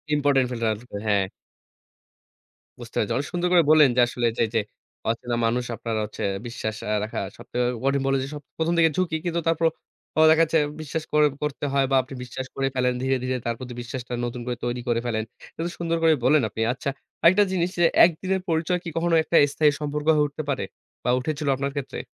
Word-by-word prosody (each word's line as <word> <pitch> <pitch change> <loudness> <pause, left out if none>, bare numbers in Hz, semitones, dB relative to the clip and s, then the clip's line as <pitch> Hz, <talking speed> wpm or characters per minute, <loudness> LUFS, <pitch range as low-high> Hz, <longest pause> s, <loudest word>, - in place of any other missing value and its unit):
Important 140 -3 +3
ফিলটা 115 -2 -1
না - - -1
থাকলে, 110 -5 -8
হ্যাঁ। 100 -2 +2 1.5
বুঝতে - - -11
পেরেছেন। - - +1
অনেক 145 +2 -2
সুন্দর 175 0 0
করে 170 -2 +6
বললেন 155 -3 +7
যে, 125 - +5
আসলে 120 -1 -1
যে, - - +3
যে - - +4 0.5
অচেনা 120 +1 -1
মানুষ 120 +2 0
আপনার 115 +1 -4
হচ্ছে, 105 - -6 0.2
বিশ্বাস 110 -3 -4 0.3
রাখা 110 - -4 0.2
সব - - -12 0.4
কঠিন। 135 0 +2
বললেন 135 0 +2
যে, - - -4 0.3
প্রথম 165 +1 +1
থেকে 165 -1 +5
ঝুঁকি, 170 -3 0
কিন্তু 170 -1 0
তারপর 165 0 +2 0.6
দেখা 160 +1 +5
যাচ্ছে, 160 0 +2 0.2
বিশ্বাস 155 +1 -4 0.4
করতে 150 0 -2
হয় 135 -1 +3
বা - - +4
আপনি 135 +2 -11
বিশ্বাস 130 +2 -6
করে 135 0 0
ফেলেন, 125 -1 +2
ধীরে, 130 +1 +1
ধীরে 130 0 -1
তার 115 -1 -1
প্রতি, 125 -1 -7
বিশ্বাসটা 125 0 -6
নতুন 120 0 -5
করে 125 -1 -3
তৈরি 120 0 -2
করে 115 -1 +2
ফেলেন। 110 -2 -1 0.3
এটা 170 +2 -2
সুন্দর 165 -1 0
করে 160 -1 +6
বললেন 145 +1 +5
আপনি। 110 - -5
আচ্ছা, 130 +2 -4 0.3
আরেকটা 185 +5 +6
জিনিস 180 -1 +1
যে, 175 - +5 0.2
একদিনের 185 +3 -1
পরিচয় 165 +2 +1
কি, 170 - -5
কখনো 170 0 +2
একটা 170 - -2 0.2
স্থায়ী 150 -1 +4
সম্পর্ক 150 0 -3
হয়ে 150 -1 +3
উঠতে 145 +2 -6
পারে 140 - -1 0.4
বা - - 0
উঠেছিল 150 +2 -3
আপনার 140 +1 -2
ক্ষেত্রে? 140 - -4
140 Hz, 200 wpm, -24 LUFS, 125-160 Hz, 1.5 s, বললেন